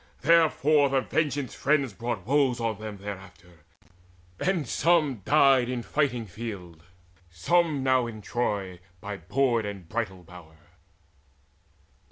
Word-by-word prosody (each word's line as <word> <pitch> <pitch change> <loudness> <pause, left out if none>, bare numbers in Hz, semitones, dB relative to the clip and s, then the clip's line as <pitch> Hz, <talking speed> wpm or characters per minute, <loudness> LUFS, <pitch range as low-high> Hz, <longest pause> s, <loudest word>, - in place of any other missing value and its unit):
Therefore 155 -2 +4
the 135 0 +2
Vengeance 145 -2 -1
friends 140 -4 +1
brought 115 -1 -4
woes 135 -1 +2
on 115 -3 -2
them 110 -1 -7
Thereafter, 95 -4 -10 0.8
and 180 -5 0
some 160 -6 +2
died 135 -4 +4
in 125 -2 -3
fighting 130 -6 -1
field, 95 -5 -8 0.5
Some 150 - +1
now 130 -2 +2
in 110 -2 -9
Troy 100 -6 -2 0.2
by 100 +2 -6
board 115 +6 0
and 100 -4 -7
bridal 95 -4 -4
bower. 85 -2 -15
120 Hz, 120 wpm, -27 LUFS, 100-140 Hz, 0.8 s, Therefore